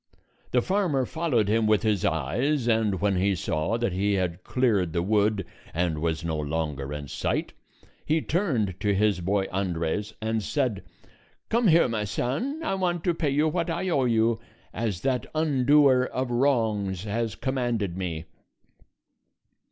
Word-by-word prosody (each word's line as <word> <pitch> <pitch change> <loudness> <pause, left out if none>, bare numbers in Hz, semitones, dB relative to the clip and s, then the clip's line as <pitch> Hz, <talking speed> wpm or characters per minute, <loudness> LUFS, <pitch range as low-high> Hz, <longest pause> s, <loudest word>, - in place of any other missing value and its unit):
The 125 -1 +2
farmer 180 -10 +1
followed 135 - 0
him 110 +1 +2
with 105 -3 +3
his 105 -4 +1
eyes, 120 - 0
and 110 -5 +2
when 100 -2 +2
he 95 +1 +2
saw 80 +5 -1
that 120 -6 -1
he 100 +2 +1
had 90 -2 -1
cleared 105 -10 +1
the 85 - 0
wood 105 -1 +1 0.3
and 85 -2 0
was 80 0 -1
no 80 -2 -1
longer 75 -2 -3
in 75 -1 -5
sight, - - -2 0.5
he 155 +1 +1
turned 130 - -1
to 100 -1 +1
his 105 -1 +2
boy 95 +2 +1
Andres 95 +2 -2
and 110 0 -1
said, 125 -2 -1 0.7
"Come 230 0 +2
here, 170 -4 +5
my 115 -3 -2
son; 150 - -2
I 310 - -1
want 175 -3 -1
to 175 - +2
pay 160 -3 -1
you 145 +3 +2
what 170 +2 -1
I 185 +3 -1
owe 140 -6 +2
you, 115 -1 +2 0.3
as 105 -5 -2
that 130 -2 0
undoer 140 -3 +4
of 130 -1 -3
wrongs 110 -8 +1
has 110 0 -2
commanded 120 -8 -1
me." 85 -4 -4
110 Hz, 160 wpm, -26 LUFS, 95-135 Hz, 0.7 s, here